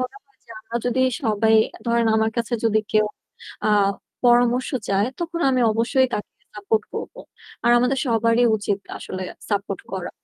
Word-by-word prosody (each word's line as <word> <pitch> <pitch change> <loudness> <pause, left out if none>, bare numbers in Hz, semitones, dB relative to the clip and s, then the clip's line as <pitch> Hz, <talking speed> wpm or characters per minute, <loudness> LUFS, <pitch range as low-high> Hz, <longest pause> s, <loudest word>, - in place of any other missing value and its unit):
মনে 255 +11 -4
হয় 415 - -36
যে, - - -19
আমরা 225 +2 -5
যদি 245 +1 +1 0.2
সবাই 220 -1 +2 0.2
আ - - -14
ধরেন 235 0 +2
আমার 220 0 +2
কাছে 235 0 -1
যদি 220 -1 +3
কেউ 215 0 +4 0.6
আ - - +3 0.6
পরামর্শ 245 +1 +3 0.2
চায়, 200 +2 +2
তখন 340 0 -3
আমি 255 -1 +1
অবশ্যই 245 +4 +2
তাকে 210 - -5 0.3
সাপোর্ট 440 +2 0
করব। - - -5 0.5
আর 240 - +4
আমাদের 255 +2 +1
সবারই 230 +1 +2
উচিত 205 -1 -2 0.2
আসলে 185 0 -6 0.3
সাপোর্ট 200 -1 -2
করা। 185 -2 -4
230 Hz, 165 wpm, -22 LUFS, 215-250 Hz, 0.6 s, কেউ